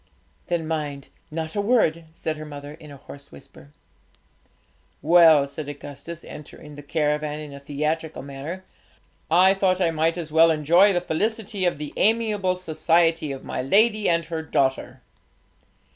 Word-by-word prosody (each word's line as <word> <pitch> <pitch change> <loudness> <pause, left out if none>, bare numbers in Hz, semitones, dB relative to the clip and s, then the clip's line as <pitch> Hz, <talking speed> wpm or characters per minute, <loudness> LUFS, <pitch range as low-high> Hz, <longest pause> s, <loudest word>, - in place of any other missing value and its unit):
'Then 170 -2 -2
mind, 150 -3 -4 0.2
not 160 0 -5
a 205 - +1
word,' 200 -8 +1
said 160 -1 -4
her 155 - -8
mother, 145 -1 -9
in 155 -1 -14
a 140 - -11
hoarse 140 +1 -13
whisper. 70 0 -15 1.3
'Well,' 160 -3 +6
said 145 +1 -7
Augustus, 145 +3 -8
entering 150 0 -11
the 145 - -10
caravan 150 0 -1
in 150 -2 -9
a 140 - -9
theatrical 150 +2 -3
manner, 145 +7 -7 0.6
'I 185 +4 +5
thought 190 -1 +1
I 170 -3 +2
might 165 +2 0
as 160 -3 -5
well 165 +1 +6
enjoy 165 +6 +4
the 175 -2 0
felicity 210 +3 -2
of 175 - 0
the 150 0 -7
amiable 210 -4 +1
society 165 -2 +1
of 135 - -8
my - - -3
lady 210 - +3
and 170 -1 +1
her 165 0 -4
daughter!' 135 -4 -1
160 Hz, 155 wpm, -23 LUFS, 150-175 Hz, 1.3 s, Well